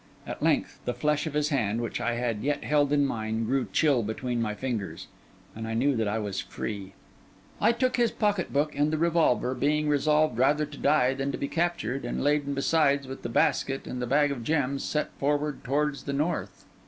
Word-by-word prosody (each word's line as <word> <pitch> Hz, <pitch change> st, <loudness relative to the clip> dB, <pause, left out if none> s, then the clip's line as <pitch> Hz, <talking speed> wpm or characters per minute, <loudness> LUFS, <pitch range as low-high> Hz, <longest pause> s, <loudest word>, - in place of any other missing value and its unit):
At -, -, -6 dB
length, -, -, +1 dB
the 125 Hz, -, -2 dB
flesh 150 Hz, +1 st, 0 dB
of 150 Hz, -, -5 dB
his 150 Hz, 0 st, +1 dB
hand, 115 Hz, -7 st, 0 dB
which 120 Hz, -1 st, -3 dB
I 120 Hz, 0 st, 0 dB
yet 145 Hz, 0 st, -1 dB
held 145 Hz, -1 st, +2 dB
in 145 Hz, -1 st, +3 dB
mine, 110 Hz, -3 st, -2 dB
grew 130 Hz, +2 st, 0 dB
chill 145 Hz, -6 st, +3 dB
between 120 Hz, +3 st, -2 dB
my 105 Hz, -2 st, -2 dB
fingers, 115 Hz, -4 st, -4 dB, 0.5 s
and 110 Hz, 0 st, -5 dB
I 115 Hz, -, -3 dB
knew 135 Hz, +4 st, +2 dB
that 110 Hz, -2 st, 0 dB
I 105 Hz, +2 st, 0 dB
was 105 Hz, -3 st, -3 dB
free. 100 Hz, -2 st, -6 dB, 0.7 s
I -, -, +4 dB
took 255 Hz, +1 st, 0 dB
his 240 Hz, -1 st, +3 dB
pocket 205 Hz, -4 st, 0 dB
book 150 Hz, +2 st, 0 dB
and 145 Hz, +2 st, +2 dB
the 155 Hz, -, 0 dB
revolver, 160 Hz, -6 st, +2 dB
being 150 Hz, +3 st, +1 dB
resolved 150 Hz, -2 st, +2 dB
rather 150 Hz, +4 st, +3 dB
to 145 Hz, -1 st, -11 dB
die 140 Hz, -3 st, +3 dB
than 135 Hz, +1 st, -2 dB
to -, -, -2 dB
be 140 Hz, -, -2 dB
captured, 165 Hz, -7 st, -1 dB
and -, -, -3 dB
laden 145 Hz, -1 st, +1 dB
besides 140 Hz, -1 st, +2 dB
with 135 Hz, -, -7 dB
the 120 Hz, -, -4 dB
basket 135 Hz, +3 st, +1 dB
and 125 Hz, -, -5 dB
the 125 Hz, -, -2 dB
bag 145 Hz, +2 st, +3 dB
of 125 Hz, -4 st, -4 dB
gems, 140 Hz, -1 st, 0 dB
set 150 Hz, -, -1 dB
forward 145 Hz, +1 st, 0 dB
towards 145 Hz, +2 st, -1 dB
the 140 Hz, -, -2 dB
north. 155 Hz, +5 st, -2 dB
140 Hz, 205 wpm, -27 LUFS, 120-150 Hz, 0.7 s, I